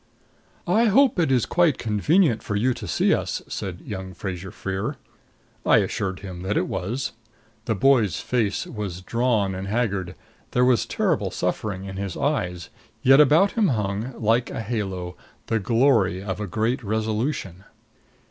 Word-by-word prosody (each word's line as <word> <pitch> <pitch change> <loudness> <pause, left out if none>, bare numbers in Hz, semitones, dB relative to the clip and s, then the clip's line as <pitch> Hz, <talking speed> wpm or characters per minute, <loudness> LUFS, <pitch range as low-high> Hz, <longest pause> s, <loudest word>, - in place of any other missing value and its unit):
"I 230 +2 +3
hope 240 0 +4
it 160 -6 +2
is 125 -3 +3
quite 170 -6 +2
convenient 120 - +2
for 105 - -3
you 125 +5 +2
to 105 - -8
see 80 - +2
us," - - -2
said 90 -2 -5
young 95 -2 -7
Fraser 95 0 -5
Freer. 95 0 -4 0.7
I - - +5
assured 95 -1 -1
him 90 -3 -7
that 95 +3 -1
it - - +1
was. 125 +9 -3 0.5
The 110 - 0
boy's 110 - +3
face 110 -5 -1
was 100 -5 -5
drawn 110 -1 +1
and 95 +1 -5
haggard; 100 -5 -1 0.4
there 125 0 +4
was 125 -5 +3
terrible - - 0
suffering 100 -3 -3
in 95 0 -7
his 100 -3 -4
eyes, 90 - -1 0.3
yet 135 +2 +7
about 160 +8 +5
him 220 -4 +2
hung, 110 - -2
like 115 +2 +2
a - - -4
halo, 95 -5 -4 0.3
the 115 - 0
glory 110 -4 +2
of 95 0 -4
a 105 - -3
great 115 +7 -1
resolution. 110 - -2
105 Hz, 155 wpm, -24 LUFS, 95-125 Hz, 0.7 s, yet